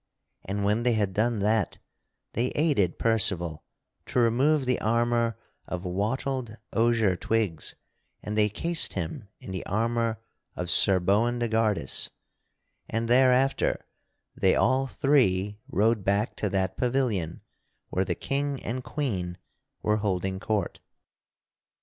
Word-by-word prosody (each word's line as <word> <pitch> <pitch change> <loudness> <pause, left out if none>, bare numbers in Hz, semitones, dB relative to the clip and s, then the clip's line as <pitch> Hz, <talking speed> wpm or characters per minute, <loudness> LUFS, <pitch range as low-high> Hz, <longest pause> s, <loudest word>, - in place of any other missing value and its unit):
And 100 +2 -3
when 105 +3 +2
they 120 0 +2
had 105 -3 0
done 110 +1 +1
that 105 -2 +1 0.6
they 120 +3 +1
aided 145 - +2
Percival 90 -8 0 0.4
to - - -4
remove 130 +5 +3
the 125 -1 0
armor 115 0 +1 0.3
of 90 0 -5
wattled 115 +5 -2 0.2
osier 115 -4 +3
twigs 100 -6 -1 0.5
and 105 - -4
they 105 -1 +3
cased 165 +11 0
him 85 +3 -4
in - - -9
the 95 - -4
armor 115 +2 0 0.4
of 90 -1 -2
Sir 95 +3 +5
Boindegardus; 110 - +2 0.8
and 115 +1 -1
thereafter 130 +2 +3 0.5
they - - +3
all 130 +1 +2
three 105 -9 +2
rode 110 +1 +2
back 100 +3 0
to 105 - -1
that 95 -1 -1
pavilion 120 -10 0 0.5
where 95 - 0
the - - -2
King 140 -1 -2
and 125 +2 -3
Queen 95 -14 -3 0.5
were 105 0 +2
holding 95 -2 -1
court. 105 -3 -2
110 Hz, 125 wpm, -27 LUFS, 95-120 Hz, 0.8 s, Sir